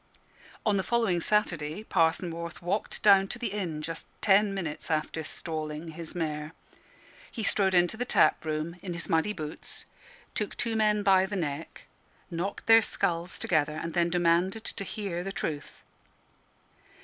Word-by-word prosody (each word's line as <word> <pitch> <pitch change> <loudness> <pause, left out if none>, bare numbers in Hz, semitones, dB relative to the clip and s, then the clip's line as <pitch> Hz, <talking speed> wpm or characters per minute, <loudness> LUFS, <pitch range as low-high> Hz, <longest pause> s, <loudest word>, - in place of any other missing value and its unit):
On 210 -2 +3
the - - +2
following 225 -7 +1
Saturday 175 -3 0
Parson 165 -2 +1
Morth 170 0 -6
walked 195 +5 -2
down 195 -2 +7
to 240 - -4
the 235 -4 -3
inn, 170 -7 -3
just 165 +1 -5
ten 205 0 +4
minutes 170 -6 -4
after 155 0 -1
stalling 155 0 -4
his 165 +2 -6
mare. 155 -2 -3 0.8
He 225 - -4
strode 195 -2 +3
into 175 +4 +3
the 245 - 0
tap 245 - +3
room 155 +2 -3
in 180 -3 -5
his 170 - -3
muddy 165 +5 +2
boots, 155 -6 -3 0.5
took 210 - -3
two 230 -2 0
men 210 -1 +3
by 190 -1 +5
the 205 - -4
neck, 155 -4 -4 0.5
knocked 175 +4 -3
their 225 0 +8
skulls 170 -4 -1
together, 155 -3 +1
and 165 0 -4
then 175 -1 +2
demanded 175 +4 +2
to 200 - -3
hear 190 -3 -4
the 195 - -4
truth. 150 -6 -5
175 Hz, 160 wpm, -29 LUFS, 160-200 Hz, 0.8 s, their